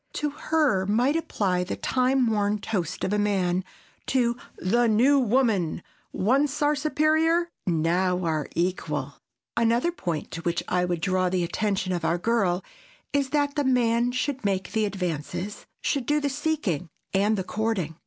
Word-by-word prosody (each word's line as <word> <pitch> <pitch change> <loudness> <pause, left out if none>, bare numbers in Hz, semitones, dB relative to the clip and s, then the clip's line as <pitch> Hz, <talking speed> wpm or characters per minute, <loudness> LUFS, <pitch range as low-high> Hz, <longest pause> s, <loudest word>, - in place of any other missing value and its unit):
To 295 -1 -1
her 280 -12 +1
might 245 +8 +2
apply 190 - 0
the 180 - -4
time 255 0 +1
worn 210 -2 +1
toast 200 -5 -3
of - - 0
man 190 -3 +1 0.4
to 240 -2 +2 0.2
"The 235 +6 +2
New 250 +6 +4
Woman,—once 245 - 0
our 295 +1 +4
superior, 315 +3 +2 0.2
now 180 +2 +1
our 155 -2 -1
equal." 155 -5 -2 0.4
Another 235 +8 +2
point 170 - -4
to 165 - -5
which 170 0 -1
I 180 0 +1
would 175 -2 -2
draw 185 0 +1
the 180 -1 0
attention 190 +1 -1
of 175 - -2
our 170 - +1
girl 190 -3 +1 0.5
is 280 -2 +1
that 290 0 +1
the 290 - +1
man 245 -2 +2
should 265 +1 -2
make 195 -2 -1
the 220 -1 +1
advances, 185 0 -4
should 275 -5 -1
do 295 +1 +3
the 290 -1 -1
seeking 270 - -1 0.2
and 205 +3 +2
the 190 - -1
courting. 200 -6 -2
210 Hz, 155 wpm, -26 LUFS, 180-265 Hz, 0.5 s, New